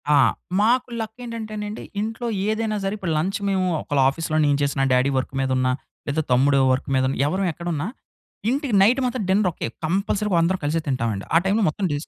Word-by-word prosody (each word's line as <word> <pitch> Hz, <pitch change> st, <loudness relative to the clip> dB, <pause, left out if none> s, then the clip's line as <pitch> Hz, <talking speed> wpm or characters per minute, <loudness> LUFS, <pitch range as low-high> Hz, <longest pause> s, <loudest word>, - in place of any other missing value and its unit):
ఆ! -, -, +6 dB, 0.4 s
మాకు 245 Hz, +4 st, +3 dB
లక్ 220 Hz, 0 st, -5 dB
ఏంటంటేనండి, 215 Hz, -2 st, -5 dB, 0.2 s
ఇంట్లో 225 Hz, +3 st, -3 dB, 0.2 s
ఏదైనా 215 Hz, 0 st, 0 dB
సరే, 195 Hz, +1 st, -1 dB
ఇప్పుడు 180 Hz, -5 st, -2 dB
లంచ్ 190 Hz, +7 st, -1 dB
మేము 190 Hz, -1 st, +1 dB, 0.2 s
ఒకవేళ 145 Hz, -2 st, 0 dB
ఆఫీస్‌లో 155 Hz, +2 st, -2 dB
నేను 145 Hz, -1 st, +3 dB
చేసిన, 140 Hz, -1 st, 0 dB
డ్యాడీ 130 Hz, +2 st, +3 dB
వర్క్ 130 Hz, -, -2 dB
మీద 135 Hz, -, 0 dB
ఉన్నా, 130 Hz, 0 st, +2 dB, 0.4 s
లేదా 145 Hz, +2 st, 0 dB
తమ్ముడు 135 Hz, +3 st, +4 dB
వర్క్ 130 Hz, -, -3 dB
మీద 130 Hz, -, +2 dB
ఉన్నా, 135 Hz, -, -3 dB
ఎవ్వరం 190 Hz, +4 st, 0 dB
ఎక్కడున్నా 170 Hz, -1 st, -3 dB, 0.6 s
ఇంటికి 270 Hz, -1 st, -1 dB
నైటు 240 Hz, +7 st, +4 dB
మాత్రం 250 Hz, -2 st, -1 dB
డిన్నర్ 195 Hz, 0 st, +3 dB
ఒకటే. -, -, -4 dB, 0.2 s
కంపల్సరీగా 195 Hz, +2 st, 0 dB
అందరం 180 Hz, +3 st, +1 dB
కలిసి 150 Hz, +3 st, +1 dB
తింటామండి. 115 Hz, -7 st, -1 dB
ఆ -, -, +9 dB
టైమ్‌లో 205 Hz, +2 st, +2 dB
మొత్తం 190 Hz, +5 st, -3 dB
డిస్ 145 Hz, +2 st, -4 dB
185 Hz, 190 wpm, -23 LUFS, 145-215 Hz, 0.6 s, ఆ